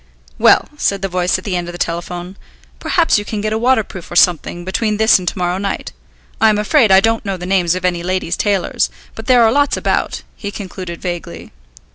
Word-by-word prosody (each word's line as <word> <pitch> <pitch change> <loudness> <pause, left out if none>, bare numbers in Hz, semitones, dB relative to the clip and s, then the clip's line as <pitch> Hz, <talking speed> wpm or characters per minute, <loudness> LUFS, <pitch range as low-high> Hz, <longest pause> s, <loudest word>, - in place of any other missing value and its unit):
"Well," - - +5
said 200 -8 0
the - - +1
voice 180 0 0
at 185 - -10
the 195 -3 -3
end 175 -1 -2
of 175 - -7
the - - -7
telephone, 175 +2 -4 0.4
"perhaps 330 - +2
you - - -4
can 210 0 -4
get 215 +1 -2
a - - 0
waterproof 225 -7 0
or - - -7
something, 175 0 +2
between 210 +3 -1
this 220 -2 +5
and 180 - -8
to - - -2
morrow 180 0 -1
night. 195 -1 -3 0.5
I 220 - +6
am 210 - +2
afraid 215 +1 +3
I 190 0 +7
don't 225 +2 +1
know 195 -2 -3
the 180 - -7
names 180 -2 +1
of 185 0 -3
any 175 -1 0
ladies' 180 -1 -2
tailors, 200 -3 0 0.2
but 220 - -9
there 250 -2 +5
are 225 - +4
lots 285 +3 +2
about," - - -1
he 205 - -6
concluded 185 -4 -7
vaguely. 175 -2 -6
190 Hz, 220 wpm, -17 LUFS, 180-215 Hz, 0.5 s, I